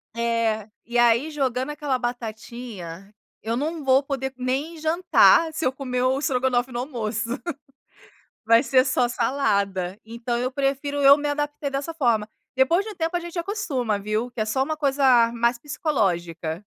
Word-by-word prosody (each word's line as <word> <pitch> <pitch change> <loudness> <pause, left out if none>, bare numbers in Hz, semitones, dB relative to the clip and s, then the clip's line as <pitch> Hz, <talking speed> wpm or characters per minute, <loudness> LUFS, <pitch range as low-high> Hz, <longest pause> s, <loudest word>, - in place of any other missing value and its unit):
É, 230 -2 0 0.2
e 240 +1 -2
aí 240 +6 +3
jogando 265 -1 -1
aquela 290 -3 -1
batatinha, 220 -6 -6 0.3
eu 230 +2 -2
não 310 +2 -3
vou 265 +1 +4
poder 265 -1 -3
em 270 +6 -2
jantar 325 0 +4
se 320 - -3
eu 255 - +1
comer 255 -2 -2
o 260 +1 +2
estrogonofe 260 -2 0
no 240 - -3
almoço, 230 -4 -3 1.2
vai 230 +2 +6
ser 255 0 +3
só 255 -2 +2
salada, 200 -8 0
então 235 +1 -3
eu 250 +1 -1
prefiro 275 +1 -1
eu 280 +1 +8
me 295 0 -2
adaptei 290 0 -2
dessa 275 +4 -3
forma. 235 -9 +1 0.3
Depois 335 +9 +3
de 435 - -6
um - - -13
tempo 330 0 -2
a 350 - -1
gente 345 +1 -7
acostuma 290 - -2
viu, 215 +4 -2
que 240 -2 -7
é - - +2
só 265 +5 0
uma 310 +3 -2
coisa 270 -5 +4
mais 235 +1 +1
psicológica. 175 - -2
255 Hz, 165 wpm, -24 LUFS, 230-290 Hz, 1.2 s, eu